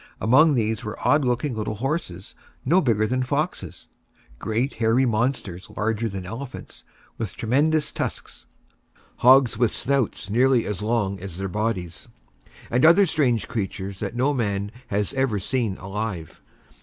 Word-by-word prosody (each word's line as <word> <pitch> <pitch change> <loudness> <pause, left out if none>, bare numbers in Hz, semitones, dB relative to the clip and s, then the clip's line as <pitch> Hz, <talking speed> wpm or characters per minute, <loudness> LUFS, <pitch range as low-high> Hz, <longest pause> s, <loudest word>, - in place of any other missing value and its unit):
Among 145 +6 +5
these 110 0 -1
were 105 -2 -5
odd 145 0 +4
looking 125 +1 0
little 110 0 -3
horses 110 - -4 0.3
no 175 +8 +4
bigger 110 - +2
than 130 +3 0
foxes; 145 +6 -3 0.5
great 115 +5 -1
hairy 115 +4 +3
monsters 110 -5 -1
larger 110 +2 0
than 95 -2 -6
elephants, 120 +7 -8 0.4
with 110 -6 -4
tremendous 150 +7 +1
tusks; - - -5 0.7
hogs 130 -2 +5
with 120 -3 +3
snouts 135 -5 -1
nearly 125 +3 +3
as 105 -2 -4
long 105 -3 0
as 90 -2 -8
their 95 0 -3
bodies; 95 -3 -3 0.6
and 125 +2 +2
other 170 +5 +7
strange 135 - +1
creatures 100 -3 -4
that 120 - -4
no 130 +4 +2
man 100 -5 -1 0.2
has 100 0 -1
ever 135 -5 0
seen 110 -1 -1
alive. 95 -4 -5
115 Hz, 145 wpm, -24 LUFS, 100-130 Hz, 0.7 s, other